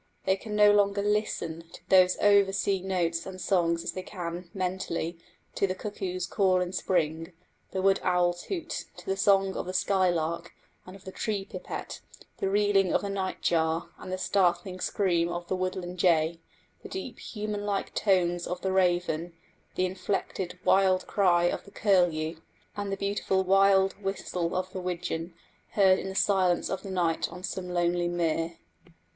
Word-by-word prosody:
They 190 Hz, -, +3 dB
can 210 Hz, +2 st, -6 dB
no 210 Hz, 0 st, +7 dB
longer 200 Hz, -1 st, +3 dB
listen 170 Hz, -6 st, -1 dB
to -, -, -14 dB
those 185 Hz, -1 st, +5 dB
over 200 Hz, -1 st, +5 dB
sea 195 Hz, -1 st, 0 dB
notes 175 Hz, -3 st, -1 dB
and 185 Hz, -1 st, -8 dB
songs 170 Hz, -3 st, +1 dB
as -, -, -2 dB
they 185 Hz, -, -5 dB
can, 175 Hz, -2 st, -6 dB
mentally, 180 Hz, -3 st, -3 dB, 0.3 s
to 195 Hz, -, +1 dB
the 185 Hz, -, -2 dB
cuckoo's 185 Hz, -3 st, -4 dB
call 185 Hz, 0 st, +2 dB
in 180 Hz, 0 st, -2 dB
spring, 165 Hz, -2 st, -1 dB, 0.4 s
the 190 Hz, -, -3 dB
wood 195 Hz, 0 st, +4 dB
owl's 175 Hz, -1 st, +1 dB
hoot, 340 Hz, -4 st, -4 dB
to -, -, -12 dB
the 195 Hz, -, 0 dB
song 195 Hz, 0 st, +3 dB
of -, -, -4 dB
the 185 Hz, -, -4 dB
skylark 175 Hz, -4 st, +1 dB, 0.3 s
and 185 Hz, -, -10 dB
of 195 Hz, -, -14 dB
the 190 Hz, -, -6 dB
tree 200 Hz, -1 st, -2 dB
pipit, 185 Hz, -1 st, -7 dB, 0.4 s
the 195 Hz, -, -1 dB
reeling 200 Hz, -2 st, +3 dB
of -, -, +2 dB
the 200 Hz, -, -3 dB
night 190 Hz, -1 st, -3 dB
jar 160 Hz, 0 st, +1 dB
and 185 Hz, -, -8 dB
the 185 Hz, -, -1 dB
startling 185 Hz, -1 st, +1 dB
scream 175 Hz, -4 st, +1 dB
of 175 Hz, 0 st, -5 dB
the 185 Hz, -, -1 dB
woodland 185 Hz, -1 st, -3 dB
jay, 165 Hz, -1 st, +3 dB, 0.4 s
the -, -, -10 dB
deep 265 Hz, -11 st, -6 dB
human 210 Hz, -1 st, -4 dB
like 200 Hz, -1 st, -2 dB
tones 175 Hz, -3 st, +1 dB
of 180 Hz, 0 st, -3 dB
the 190 Hz, -, -1 dB
raven, 175 Hz, -3 st, +1 dB, 0.4 s
the 185 Hz, -, +1 dB
inflected 185 Hz, -1 st, -3 dB
wild 190 Hz, -1 st, +4 dB
cry 180 Hz, -4 st, +3 dB
of 175 Hz, -, 0 dB
the -, -, -14 dB
curlew, 175 Hz, -6 st, +1 dB, 0.4 s
and 205 Hz, -1 st, -3 dB
the 195 Hz, -, -2 dB
beautiful 200 Hz, -1 st, 0 dB
wild 195 Hz, 0 st, +4 dB
whistle 185 Hz, -3 st, -2 dB
of 185 Hz, 0 st, -2 dB
the 185 Hz, -, -4 dB
widgeon, 175 Hz, -1 st, -4 dB, 0.4 s
heard 190 Hz, -2 st, +5 dB
in 190 Hz, -, -5 dB
the 190 Hz, -, -7 dB
silence 185 Hz, -3 st, +2 dB
of 190 Hz, -, -2 dB
the 200 Hz, -, -8 dB
night 175 Hz, -3 st, 0 dB
on 180 Hz, +2 st, -9 dB
some 185 Hz, 0 st, -4 dB
lonely 175 Hz, 0 st, +1 dB
mere. 165 Hz, -1 st, -1 dB
185 Hz, 175 wpm, -28 LUFS, 175-195 Hz, 0.4 s, no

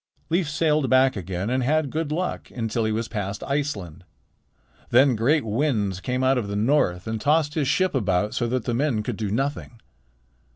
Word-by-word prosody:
Leif 170 Hz, -2 st, +1 dB
sailed 155 Hz, -2 st, +1 dB
back 130 Hz, 0 st, +4 dB
again 95 Hz, +2 st, -3 dB
and 130 Hz, +1 st, +1 dB
had 145 Hz, +2 st, +1 dB
good 155 Hz, -1 st, -2 dB
luck 180 Hz, +4 st, -3 dB
until 115 Hz, -1 st, -2 dB
he 110 Hz, -, 0 dB
was 115 Hz, +1 st, -2 dB
past 105 Hz, -2 st, -4 dB
Iceland. 105 Hz, -, -3 dB, 0.9 s
Then 130 Hz, +1 st, +5 dB
great 125 Hz, +5 st, +2 dB
winds 105 Hz, -5 st, 0 dB
came 125 Hz, +5 st, -2 dB
out 130 Hz, 0 st, +3 dB
of 110 Hz, -, -4 dB
the 100 Hz, -, -4 dB
north 105 Hz, -6 st, +1 dB
and 110 Hz, -1 st, -3 dB
tossed 150 Hz, +1 st, +2 dB
his 150 Hz, -4 st, 0 dB
ship 185 Hz, +7 st, +1 dB
about 105 Hz, -4 st, 0 dB
so 120 Hz, -, -1 dB
that 125 Hz, -1 st, -2 dB
the 120 Hz, -, -1 dB
men 120 Hz, -4 st, 0 dB
could -, -, -3 dB
do 105 Hz, -2 st, -3 dB
nothing. 130 Hz, +1 st, -3 dB
125 Hz, 190 wpm, -24 LUFS, 105-145 Hz, 0.9 s, Then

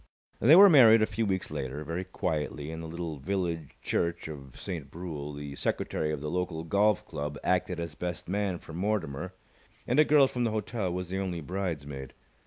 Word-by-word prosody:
They 140 Hz, +8 st, +7 dB
were 200 Hz, +3 st, +10 dB
married 115 Hz, -, +8 dB
a -, -, +5 dB
few 110 Hz, +1 st, -2 dB
weeks 95 Hz, -1 st, -1 dB
later, 70 Hz, +3 st, -4 dB
very 85 Hz, +4 st, -3 dB
quietly, 75 Hz, -4 st, -3 dB
in 80 Hz, 0 st, -6 dB
the 80 Hz, -, -6 dB
little 85 Hz, -1 st, -5 dB
village 85 Hz, -1 st, -3 dB
church 85 Hz, -1 st, -1 dB
of 70 Hz, -5 st, -9 dB
Saint 80 Hz, -7 st, -5 dB
Brule. 75 Hz, -3 st, -6 dB
The 70 Hz, -1 st, -7 dB
secretary 75 Hz, +2 st, -1 dB
of 75 Hz, -2 st, -3 dB
the 75 Hz, 0 st, -3 dB
local 90 Hz, -3 st, -2 dB
golf 100 Hz, +4 st, +2 dB
club 75 Hz, -2 st, -4 dB
acted 90 Hz, -1 st, +1 dB
as 85 Hz, 0 st, -4 dB
best 90 Hz, 0 st, -5 dB
man 100 Hz, -1 st, -1 dB
for 80 Hz, -, -12 dB
Mortimer, 90 Hz, -3 st, -2 dB, 0.5 s
and 125 Hz, +5 st, +2 dB
a -, -, +9 dB
girl 145 Hz, -2 st, +5 dB
from 125 Hz, -1 st, -2 dB
the 115 Hz, -, +2 dB
hotel 110 Hz, -2 st, -2 dB
was 90 Hz, 0 st, -4 dB
the 95 Hz, +1 st, -2 dB
only 90 Hz, -3 st, -2 dB
bridesmaid. 75 Hz, -6 st, -4 dB
85 Hz, 195 wpm, -29 LUFS, 75-100 Hz, 0.5 s, were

